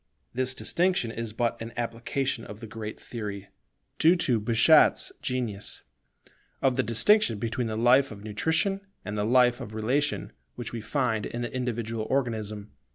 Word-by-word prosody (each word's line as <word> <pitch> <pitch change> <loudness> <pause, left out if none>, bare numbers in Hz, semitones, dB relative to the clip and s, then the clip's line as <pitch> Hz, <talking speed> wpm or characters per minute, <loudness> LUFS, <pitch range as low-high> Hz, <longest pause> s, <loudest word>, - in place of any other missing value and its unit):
This 130 +1 0
distinction 175 -9 +1
is 115 -1 -4
but 115 +1 -1
an 115 +1 -6
application 120 +1 -2
of 105 -1 -9
the 115 - -8
great 110 0 -7
theory, 105 -4 -6 0.5
due 165 +3 +6
to 130 -10 +1
Bichat's 115 +8 +5
genius, 120 -6 -3 0.8
of 130 -2 +2
the 130 - +3
distinction 120 - +3
between 115 +3 -2
the 110 -1 -3
life 125 +4 +5
of 100 -2 -10
nutrition 160 - +1 0.2
and 105 - -4
the 105 - 0
life 125 +1 +4
of 110 - -7
relation 130 +7 0 0.2
which 120 -2 -6
we 115 - -4
find 110 -2 -1
in 120 +1 -4
the 120 - -5
individual 115 -3 -2
organism. 110 -6 -2
115 Hz, 160 wpm, -27 LUFS, 110-130 Hz, 0.8 s, due